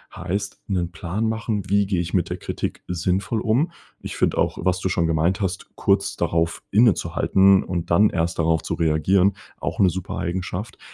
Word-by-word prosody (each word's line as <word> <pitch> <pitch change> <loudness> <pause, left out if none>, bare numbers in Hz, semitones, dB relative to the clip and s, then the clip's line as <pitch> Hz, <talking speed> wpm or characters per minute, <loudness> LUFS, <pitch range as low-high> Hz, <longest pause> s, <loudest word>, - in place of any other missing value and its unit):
Heißt: 90 +3 -4
'Nen 90 -4 -1
Plan 90 +6 -2
machen, 110 -3 -3
wie 100 0 +3
gehe 95 -3 0
ich 85 0 -5
mit 90 - 0
der - - -2
Kritik - - -4
sinnvoll 95 +5 -1
um. 120 +10 +1 0.3
Ich - - -7
finde - - +1
auch, - - +1
was 90 +1 +1
du 95 - -1
schon 85 -2 +1
gemeint 80 +4 +1
hast, 95 -1 -3
kurz 100 -1 +1
darauf 85 0 -1
innezuhalten 100 -3 +4
und 85 -2 -4
dann 100 +5 +5
erst 85 0 -2
darauf 80 0 +2
zu - - -3
reagieren, 85 +4 +2 0.2
auch - - -4
'ne 95 - +5
super 90 +1 -5
Eigenschaft. 90 +4 -4
95 Hz, 180 wpm, -23 LUFS, 85-100 Hz, 0.3 s, dann